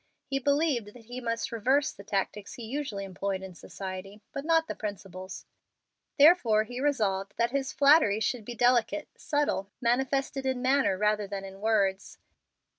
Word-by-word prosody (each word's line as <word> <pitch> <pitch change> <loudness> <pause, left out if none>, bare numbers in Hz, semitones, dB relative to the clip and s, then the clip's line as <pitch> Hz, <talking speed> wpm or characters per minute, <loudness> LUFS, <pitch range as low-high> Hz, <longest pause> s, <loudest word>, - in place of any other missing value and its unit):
He 275 0 -1
believed 280 -4 +1
that 235 -2 -14
he 245 +2 -7
must 230 0 -2
reverse 260 +5 +2
the 200 - -13
tactics 200 0 -3
he 240 - -8
usually 225 -4 -4
employed 195 0 -3
in 190 -1 -8
society, 190 +3 -8
but 275 - -5
not 325 0 +3
the - - -3
principles. 190 -3 -7 0.7
Therefore 280 -9 +6
he 245 +3 -6
resolved 205 -9 0
that 235 0 +1
his 275 -1 -1
flattery 280 -7 +5
should 220 +2 -1
be 240 +3 -7
delicate, 245 +5 +2
subtle, 290 -10 -1
manifested 265 +3 0
in 260 -1 0
manner 260 -6 +2
rather 210 0 +1
than 195 -1 -5
in 195 0 -11
words. 200 -3 0
230 Hz, 160 wpm, -29 LUFS, 200-270 Hz, 0.7 s, Therefore